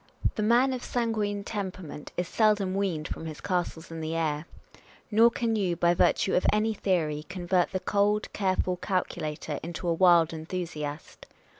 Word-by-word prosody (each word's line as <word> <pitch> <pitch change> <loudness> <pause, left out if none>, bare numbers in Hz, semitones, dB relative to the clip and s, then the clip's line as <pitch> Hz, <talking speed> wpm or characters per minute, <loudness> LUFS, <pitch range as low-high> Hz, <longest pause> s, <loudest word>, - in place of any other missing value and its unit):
The - - -3
man 240 +5 +4
of 250 - -5
sanguine 215 -4 -1
temperament 185 -8 -6
is 180 - -1
seldom 210 -2 +2
weaned 185 -6 -1
from 160 - -6
his 155 -2 -7
castles 175 -3 -2
in 165 0 -5
the 160 +1 -3
air; 155 -1 -1 0.6
nor 225 +2 +6
can 230 -1 -1
you, 190 -5 0
by 170 +1 +3
virtue 190 +2 +2
of 180 - +3
any 215 +1 +1
theory, 160 -7 0
convert 180 0 0
the 185 - -1
cold, 205 +1 +1
careful 185 -2 0
calculator 165 -5 -3
into 170 +2 -5
a 170 - +3
wild 170 -2 +5
enthusiast. 160 -2 -6
185 Hz, 160 wpm, -28 LUFS, 165-205 Hz, 0.6 s, nor